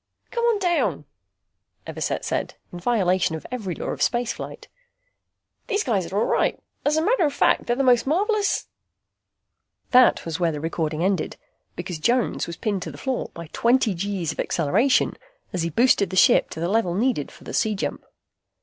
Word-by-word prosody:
"Come 470 -1 -2
on 470 -2 +3
down," 295 - 0 0.8
Everset - - -3
said, - - -2 0.2
in 175 - -6
violation 185 -5 +1
of 160 - -8
every 205 -9 -4
law - - -5
of - - -4
spaceflight. 240 0 -2 1.0
"These 415 -3 0
guys 190 -8 -1
are 195 - -2
all 215 - +2
right. - - +1 0.2
As 300 +2 +2
a 315 - +2
matter 415 0 +2
of 290 -3 0
fact, - - +2
they're 240 - +2
the 275 - 0
most 250 -1 +4
marvelous 405 - +1 0.6
" - - -50
That 250 -1 +5
was 165 +1 -4
where 170 -2 +2
the 150 - -5
recording 160 0 -2
ended, 190 -3 0 0.4
because 175 -2 -5
Jones 240 +9 +1
was 170 -1 -6
pinned 200 -2 -2
to - - -5
the - - -11
floor 265 -2 -3
by 170 -2 -8
twenty 235 -2 +3
G's 180 -3 -2
acceleration 205 - +2 0.4
as 180 - -1
he 165 - -1
boosted 210 - +3
the 190 - -5
ship - - +5
to - - -7
the 170 - -1
level 190 -3 +1
needed 225 - 0
for - - -16
the - - -8
C 215 -1 +1
jump. 195 - -4
205 Hz, 185 wpm, -24 LUFS, 170-260 Hz, 1.0 s, That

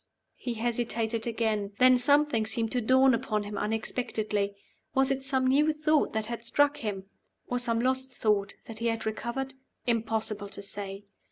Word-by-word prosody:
He 240 -2 -4
hesitated 230 -1 -1
again. 220 -3 -1
Then 255 0 +7
something 280 -3 +3
seemed 225 0 -1
to 250 - 0
dawn 260 +3 +5
upon 215 -2 -1
him 205 0 -6
unexpectedly. 210 -2 -2 0.4
Was 270 0 +4
it 270 0 -1
some 265 -1 +1
new 290 +4 +4
thought 305 0 +2
that 220 0 -1
had 235 +1 -5
struck 290 +4 +2
him? 200 -6 -4 0.4
or 245 - -1
some 230 -2 0
lost 260 +1 0
thought 205 -2 +1
that 220 -1 -8
he 235 - 0
had 225 -1 -1
recovered? 235 +5 -3 0.3
Impossible 220 -3 -1
to 200 - -6
say. 200 0 -5
230 Hz, 165 wpm, -29 LUFS, 215-260 Hz, 0.4 s, Then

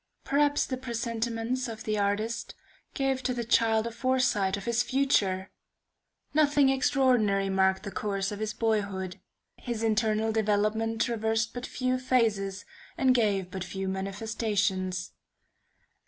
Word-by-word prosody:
Perhaps 290 +1 +2
the 260 - -3
presentiments 235 0 -2
of 220 -1 -7
the 215 -1 -1
artist 205 +3 -1 0.4
gave 270 -1 0
to 255 -1 -1
the 240 - -2
child 225 -1 +3
a 235 - -3
foresight 235 -6 +1
of 200 - -8
his 235 0 +2
future! 205 -9 +1 0.8
Nothing 290 -2 +4
extraordinary 250 -7 +2
marked 190 0 +2
the 200 - -5
course 195 +1 -2
of 205 - -5
his 215 0 -2
boyhood; 200 -5 -1 0.4
his 235 -3 -4
internal 220 0 +1
development 220 +1 +1
traversed 225 -1 0
but 245 +1 -5
few 255 0 -1
phases, 210 -6 0 0.3
and 260 -1 +4
gave 200 -6 +1
but 190 -1 -4
few 190 +1 -4
manifestations. 195 -2 -1
220 Hz, 130 wpm, -28 LUFS, 200-245 Hz, 0.8 s, Nothing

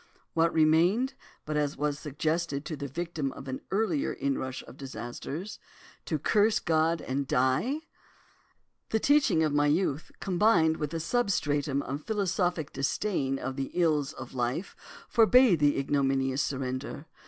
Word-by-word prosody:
"What 165 0 +3
remained, 170 - +3 0.3
but 155 - -3
as 145 -1 -1
was 145 0 -1
suggested 155 0 -2
to 155 - -4
the 140 -1 -5
victim 160 -2 -3
of 135 - -10
an 130 0 -4
earlier 190 -7 0
inrush 130 -1 -3
of - - -13
disasters? 135 - -6 0.5
To - - -1
curse 210 0 +3
God, 160 0 +1
and 135 +1 -2
die? 130 - +1 1.1
The 220 - +1
teaching 285 - +3
of 155 -2 +1
my 145 0 +3
youth, 155 -1 0
combined 175 -4 +3
with 150 -1 -3
a - - -1
substratum 150 - 0
of 140 +3 -4
philosophic 180 -6 -1
disdain 135 -1 -1
of 135 +1 -5
the 135 -1 -2
ills 155 -5 +2
of 130 -1 -9
life, 125 +8 -2 0.3
forbade 235 - +5
the 145 -1 +3
ignominious 135 -1 +1
surrender. 135 +2 -3
150 Hz, 140 wpm, -29 LUFS, 135-175 Hz, 1.1 s, forbade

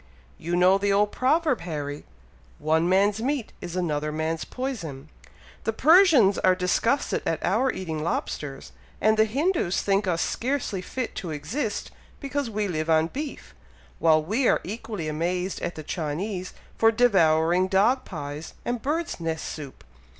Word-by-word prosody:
"You 170 +2 -2
know 185 +2 +5
the 200 0 +1
old 205 +1 +3
proverb, 290 - +1
Harry, 150 -4 -5 0.5
'one 160 +3 +1
man's 200 +3 +3
meat 270 -1 -2
is 175 - -6
another 150 -4 -1
man's 160 +1 -2
poison.' 215 - -5 0.5
The 225 - -1
Persians 300 - +6
are 185 0 +4
disgusted 185 +9 +1
at - - -1
our 265 0 +2
eating 160 -5 -4
lobsters; 145 -3 -4 0.3
and 215 +1 +4
the 220 0 +4
Hindoos 280 - 0
think 195 0 +1
us 170 -2 +1
scarcely 245 -6 -2
fit 250 +6 -4
to 175 - -4
exist, 205 - -3 0.3
because 280 -2 -2
we 210 -1 -1
live 155 -3 -2
on 160 0 +3
beef; 290 +1 -6 0.5
while 155 -1 +4
we 225 - +1
are - - +4
equally 210 -4 -5
amazed 180 +4 -2
at 175 - -3
the 155 - -7
Chinese 180 +5 -4 0.3
for 225 0 +6
devouring 180 -6 +3
dog 210 +8 +3
pies, 150 -2 -7
and 240 -1 -2
birds' 320 - -2
nest 165 -1 -3
soup. 145 -4 -8
190 Hz, 150 wpm, -25 LUFS, 160-235 Hz, 0.5 s, Persians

